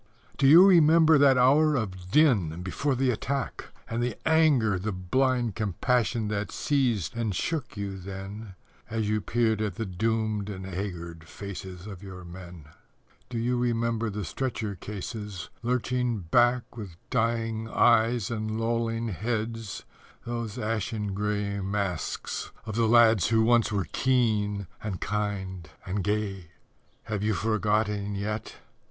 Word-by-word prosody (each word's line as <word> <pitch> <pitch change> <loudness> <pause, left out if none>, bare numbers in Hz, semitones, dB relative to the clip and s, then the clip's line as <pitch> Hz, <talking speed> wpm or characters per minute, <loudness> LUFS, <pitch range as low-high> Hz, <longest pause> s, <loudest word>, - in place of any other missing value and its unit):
Do 135 - +3
you 165 +7 +9
remember 160 -4 +6
that 140 -2 +6
hour 145 +5 +5
of 95 -7 -4
din 100 - +3
before 135 +9 -1
the 130 0 +2
attack 135 +3 -3 0.2
And 115 +1 -2
the 120 0 -1
anger, 145 - +4
the 105 +4 -2
blind 120 +5 0
compassion 110 +3 0
that 105 0 -2
seized 125 - 0
and 110 -5 -1
shook 140 - -3
you 100 -1 -4
then 95 +2 -8 0.3
As 110 -1 -1
you 105 0 +1
peered 110 -1 +1
at 105 -4 -2
the 115 - -3
doomed 110 +1 -1
and 95 -2 -6
haggard 85 -4 -6
faces 95 -1 -8
of 100 -4 -8
your 95 -2 -9
men? 85 -3 -10 0.6
Do 120 - -4
you 120 +2 0
remember 115 -1 0
the 105 -1 -4
stretcher 110 +2 -3
cases 105 -1 -6
lurching 125 -1 0
back 120 0 +3
With 100 -8 -8
dying 115 -2 0
eyes 115 -2 +3
and 110 -1 -2
lolling 115 0 -1
heads, 110 +1 -3 0.4
those 115 -3 -4
ashen 105 -1 -2
grey 100 0 -1
Masks 95 -4 -3 0.2
of 110 -2 -5
the 115 -1 +2
lad 115 -4 +6
who 110 -1 +3
once 115 -1 +3
were 100 -3 0
keen 105 -6 +1 0.2
and 105 -4 -4
kind 95 -5 -3 0.2
and 95 +1 -2
gay? 105 -3 -2 0.6
_Have 105 -3 -2
you 105 0 +1
forgotten 105 0 0
yet?... 105 +2 -4
110 Hz, 140 wpm, -27 LUFS, 100-120 Hz, 0.6 s, you